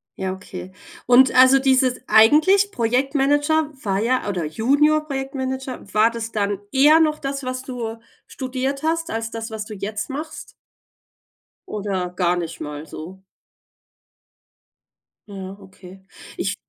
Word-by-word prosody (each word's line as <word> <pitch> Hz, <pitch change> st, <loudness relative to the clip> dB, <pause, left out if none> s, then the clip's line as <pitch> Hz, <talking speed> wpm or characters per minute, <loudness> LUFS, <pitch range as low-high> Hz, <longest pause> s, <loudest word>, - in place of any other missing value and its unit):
Ja, 190 Hz, -1 st, -3 dB
okay. 185 Hz, -1 st, -9 dB, 0.4 s
Und 250 Hz, +2 st, +6 dB
also, 260 Hz, +1 st, +7 dB
dieses 260 Hz, -1 st, +2 dB
eigentlich 315 Hz, -, +5 dB
Projektmanager 285 Hz, -, +1 dB
war 195 Hz, -2 st, 0 dB
ja 235 Hz, 0 st, 0 dB
oder 180 Hz, -5 st, -2 dB
Junior-Projektmanager, 270 Hz, -, -1 dB
war 215 Hz, +3 st, +4 dB
das 230 Hz, -1 st, -5 dB
dann 205 Hz, -2 st, -1 dB
eher 295 Hz, +4 st, +6 dB
noch 305 Hz, -2 st, +2 dB
das, 275 Hz, -1 st, -4 dB
was 255 Hz, 0 st, -4 dB
du 235 Hz, -4 st, -5 dB, 0.3 s
studiert 265 Hz, +1 st, -4 dB
hast 330 Hz, +1 st, -1 dB
als 225 Hz, -5 st, -3 dB
das, 225 Hz, 0 st, -5 dB
was 220 Hz, -1 st, -5 dB
du 215 Hz, -, -8 dB
jetzt 210 Hz, +3 st, -5 dB
machst? 305 Hz, +2 st, -7 dB, 1.2 s
Oder 195 Hz, -4 st, -3 dB
gar 180 Hz, -1 st, +1 dB
nicht 170 Hz, -2 st, -5 dB
mal 150 Hz, 0 st, -6 dB
so? 165 Hz, +5 st, -9 dB, 2.1 s
Ja, 195 Hz, -1 st, -8 dB
okay. 190 Hz, -1 st, -15 dB, 0.3 s
Ich 200 Hz, +1 st, -2 dB
245 Hz, 125 wpm, -21 LUFS, 200-275 Hz, 2.1 s, also